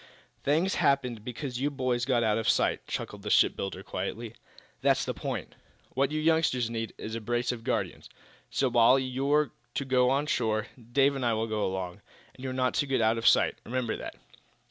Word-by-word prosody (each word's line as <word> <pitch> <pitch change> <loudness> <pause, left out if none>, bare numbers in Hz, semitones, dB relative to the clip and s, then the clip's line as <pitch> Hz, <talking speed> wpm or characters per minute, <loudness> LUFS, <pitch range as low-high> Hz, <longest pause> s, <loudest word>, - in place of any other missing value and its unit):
"Things 165 +7 +2
happened 125 -6 +1
because 125 +1 -5
you 145 - +2
boys 130 -3 -1
got 125 -3 +2
out 110 0 +2
of 110 - -3
our - - +5
sight," - - +1
chuckled - - -5
the - - -5
shipbuilder, 95 -1 +2
quietly. 105 +5 -5 0.5
"That's - - +3
the - - -2
point. - - -5 0.4
What 135 +1 +2
you 155 - -1
youngsters 155 -7 +2
need 115 -1 -4
is 110 - -6
a 115 - -3
brace 120 +3 0
of 120 -2 -7
guardians. - - -2 0.4
So, 135 - +1
while 120 +1 +5
you're 135 +2 +1 0.2
to 140 - -1
go 125 -1 +3
on 140 +3 +1
shore, 110 -7 0 0.3
Dave 140 +2 +4
and 135 - -3
I 120 -1 +2
will 110 +1 0
go 110 -2 -2
along, 95 -1 -4 0.3
and 130 - -13
you're 130 - -3
not 130 0 0
to 145 - -3
get 135 -2 +1
out 110 +1 +3
of 115 - -6
our - - +6
sight. - - +4
Remember 120 -1 -2
that." - - -7
125 Hz, 205 wpm, -29 LUFS, 115-135 Hz, 0.5 s, our